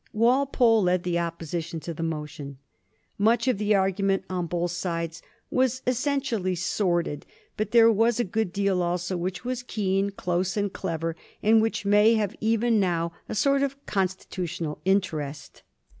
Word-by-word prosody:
Wal 245 +6 +3
pole 230 -5 +4
led 180 -1 +2
the 175 -1 0
Opposition 170 0 -4
to 170 - -5
the 165 - -7
motion. 150 -3 -5 0.6
Much 230 +4 +3
of 250 -6 +2
the 210 0 +2
argu 195 0 +1
ment 195 -1 +2
on 180 -2 -2
both 175 0 -1
sides 170 -2 -3 0.3
was 260 0 +1
essentially 250 -7 0
sordid, 175 -4 -1 0.3
but 215 -1 -2
there 230 0 +6
was 225 +2 +2
a - - +3
good 210 -1 -1
deal 195 -1 +1
also 180 +1 -1
which 180 +3 -4
was 255 0 -2
keen, 200 -4 0
close, 180 -1 -2
and 205 -1 -1
clever, 165 -3 -3 0.3
and 220 +1 +5
which 220 -2 -1
may 210 +3 +5
have 210 -3 -1
even 225 0 +2
now 170 -3 0 0.2
a - - -3
sort 275 +5 +3
of 275 0 -1
constitutional 180 -4 -3
interest. 155 -7 -1
190 Hz, 160 wpm, -26 LUFS, 175-225 Hz, 0.6 s, there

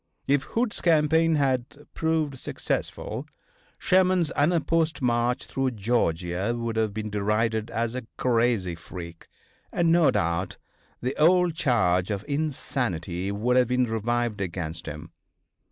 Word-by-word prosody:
If 140 0 +3
Hood's 230 -1 -2
campaign 160 0 +3
had 135 0 -1
proved 160 -4 -1
successful - - -4 0.5
Sherman's 185 -3 +3
unopposed 160 0 +1
march 120 0 +1
through 135 -1 -1
Georgia 95 -1 0
would 115 -1 -3
have 110 -2 +1
been 110 0 -5
derided 110 +2 0
as 115 0 -2
a 130 -3 -5
crazy 115 -7 +1
freak, 85 0 -9 0.4
and, 170 -1 +2
no 170 -2 +5
doubt, 85 +3 -1 0.5
the 130 +2 -1
old 175 +2 +4
charge 115 - +2
of 100 -1 -3
insanity 110 - -2
would 120 +5 +1
have 125 -2 +4
been 125 +1 +2
revived 115 -1 -1
against 85 -3 -4
him. 75 0 -7
120 Hz, 125 wpm, -26 LUFS, 100-150 Hz, 0.5 s, no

